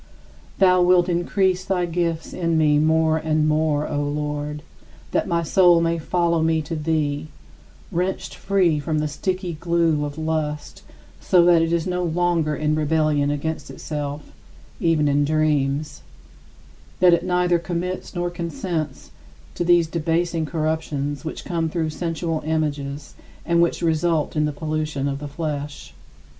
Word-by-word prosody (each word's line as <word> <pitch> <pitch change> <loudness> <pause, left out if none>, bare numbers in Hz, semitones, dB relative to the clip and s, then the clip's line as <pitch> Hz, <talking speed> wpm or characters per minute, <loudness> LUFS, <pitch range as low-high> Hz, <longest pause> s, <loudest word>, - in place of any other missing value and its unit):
Thou 185 -1 +5
wilt 180 0 +4
increase 185 +1 +1
thy 185 -2 0
gifts 170 -1 -2
in 165 -2 0
me 150 -2 +4
more 160 +1 +3
and 155 -1 +1
more, 155 -1 +1
O 145 - -1
Lord, 150 0 -3 0.5
that - - 0
my 170 -1 0
soul 175 +1 +5
may 165 0 0
follow 170 0 +1
me 160 0 +2
to 165 +3 -5
thee, 150 -1 -1 0.6
wrenched 180 +3 -2
free 185 -6 +1
from 155 +2 -2
the 150 0 0
sticky 185 +4 -3
glue 165 -2 +1
of 145 0 -5
lust 155 -2 -3 0.4
so 175 -2 +4
that 175 -2 +5
it 165 0 0
is 170 -1 +1
no 180 -1 -1
longer 170 -2 +1
in 155 +1 0
rebellion 155 -1 +1
against 145 +1 -3
itself, 145 -1 -5 0.5
even 165 -3 +2
in 145 0 +2
dreams; 150 - 0 1.0
that 180 -1 +6
it 170 - +2
neither 180 -1 +2
commits 180 +2 -4
nor 175 0 -1
consents 170 -3 -4 0.4
to - - -2
these 175 -1 +4
debasing 165 0 -1
corruptions 155 -3 -2
which 160 - -6
come 165 -2 -1
through 160 -1 -2
sensual 165 0 -2
images 145 -2 -2 0.3
and 170 0 +3
which 170 0 +1
result 160 -1 +1
in 150 0 +2
the 150 - -1
pollution 155 -2 -2
of 140 0 -3
the 145 - -6
flesh. 145 -1 -5
160 Hz, 150 wpm, -22 LUFS, 150-170 Hz, 1.0 s, that